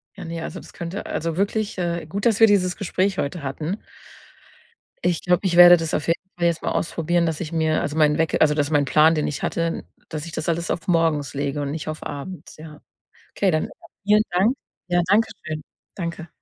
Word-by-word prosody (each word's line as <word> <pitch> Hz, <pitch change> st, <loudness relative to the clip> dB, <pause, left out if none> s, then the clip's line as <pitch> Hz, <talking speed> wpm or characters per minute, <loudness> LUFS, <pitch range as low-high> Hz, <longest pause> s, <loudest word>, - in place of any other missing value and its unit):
Ja, 195 Hz, -, -8 dB
ne, 165 Hz, 0 st, -5 dB
also, -, -, -6 dB
das -, -, -14 dB
könnte 175 Hz, +4 st, -5 dB
also 165 Hz, +1 st, -3 dB
wirklich, 205 Hz, +2 st, -1 dB
äh, 170 Hz, -2 st, -2 dB
gut, 195 Hz, +6 st, -4 dB
dass 220 Hz, -3 st, +2 dB
wir 225 Hz, -, +9 dB
dieses 185 Hz, -3 st, +2 dB
Gespräch 195 Hz, 0 st, 0 dB
heute 160 Hz, +4 st, -2 dB
hatten. 150 Hz, +7 st, -3 dB, 1.3 s
Ich 175 Hz, -2 st, +1 dB
glaube, 180 Hz, +2 st, +1 dB
ich 175 Hz, -2 st, +1 dB
werde 175 Hz, 0 st, +11 dB
das 165 Hz, -2 st, -3 dB
auf -, -, -1 dB
jeden 165 Hz, -, +1 dB, 0.2 s
Fall 170 Hz, -, 0 dB
jetzt 165 Hz, -2 st, -1 dB
mal -, -, -2 dB
ausprobieren, 170 Hz, +1 st, 0 dB
dass 160 Hz, -2 st, -2 dB
ich 165 Hz, -2 st, -5 dB
mir 160 Hz, -1 st, +1 dB
also 145 Hz, +2 st, -3 dB
meinen 150 Hz, -1 st, +4 dB
Weck 160 Hz, -1 st, +1 dB
also 150 Hz, -1 st, +5 dB
dass 145 Hz, -1 st, 0 dB
mein 145 Hz, -2 st, +2 dB
Plan, 155 Hz, +3 st, +5 dB
den 155 Hz, -2 st, 0 dB
ich 145 Hz, -, -4 dB
hatte, 165 Hz, 0 st, -1 dB, 0.2 s
dass 155 Hz, -1 st, -5 dB
ich 170 Hz, -, -8 dB
das 155 Hz, 0 st, -4 dB
alles 170 Hz, 0 st, -1 dB
auf 170 Hz, -, -4 dB
morgens 165 Hz, -5 st, +1 dB
lege 140 Hz, +1 st, -2 dB
und 140 Hz, -, -3 dB
nicht 155 Hz, 0 st, -5 dB
auf 155 Hz, -, -6 dB
abends, 150 Hz, +3 st, -7 dB
ja. 155 Hz, -1 st, -11 dB, 0.5 s
Okay, 195 Hz, -, +1 dB
dann 155 Hz, -2 st, -1 dB, 0.3 s
vielen 210 Hz, +1 st, +5 dB
Dank. 190 Hz, +8 st, +3 dB, 0.3 s
Ja, 175 Hz, 0 st, +3 dB
Danke 220 Hz, +3 st, +4 dB, 0.2 s
schön. 155 Hz, -1 st, -4 dB, 0.3 s
Danke. 170 Hz, -2 st, -5 dB
165 Hz, 215 wpm, -23 LUFS, 155-180 Hz, 1.3 s, werde